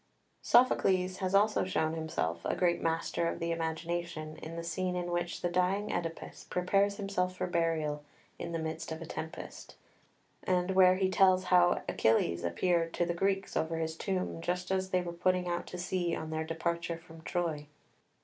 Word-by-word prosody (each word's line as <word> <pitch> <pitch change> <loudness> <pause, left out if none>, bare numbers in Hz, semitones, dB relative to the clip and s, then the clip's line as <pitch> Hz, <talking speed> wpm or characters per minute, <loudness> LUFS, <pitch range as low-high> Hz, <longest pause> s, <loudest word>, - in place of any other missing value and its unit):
] - - -43
7 245 - +7
Sophocles 185 -4 +1
has 190 0 0
also 210 +2 +4
shown 160 -4 0
himself 85 - -2
a - - 0
great 175 -1 +2
master 165 +1 0
of - - -2
the 170 0 -2
imagination 165 -1 -3
in 160 +1 -8
the 170 - -4
scene 180 +2 -2
in 175 -1 -2
which 175 0 -2
the - - +1
dying 185 +4 +1
Oedipus 165 -1 -4
prepares 195 +3 +2
himself 185 -3 -1
for - - -2
burial 165 -4 0 0.4
in 170 - -4
the 165 - -1
midst 160 0 -4
of 160 - -4
a 165 - -7
tempest, 160 0 -7 0.7
and 180 0 +1
where 185 -1 +6
he 190 0 +2
tells 185 0 +4
how 175 -1 +4
Achilles 100 -6 +2
appeared 165 - +1
to 175 - +1
the 170 - -1
Greeks 195 +2 0
over 160 +1 0
his 160 0 -2
tomb 185 -2 -2
just 180 +2 -2
as 190 0 0
they 185 -1 +2
were 170 -1 -5
putting 180 +1 +1
out 175 0 -2
to 180 - -6
sea 175 -1 -1
on 160 0 -5
their 160 0 -2
departure 170 +1 -2
from 165 -1 -14
Troy. 160 -4 -2
175 Hz, 190 wpm, -31 LUFS, 165-185 Hz, 0.7 s, 7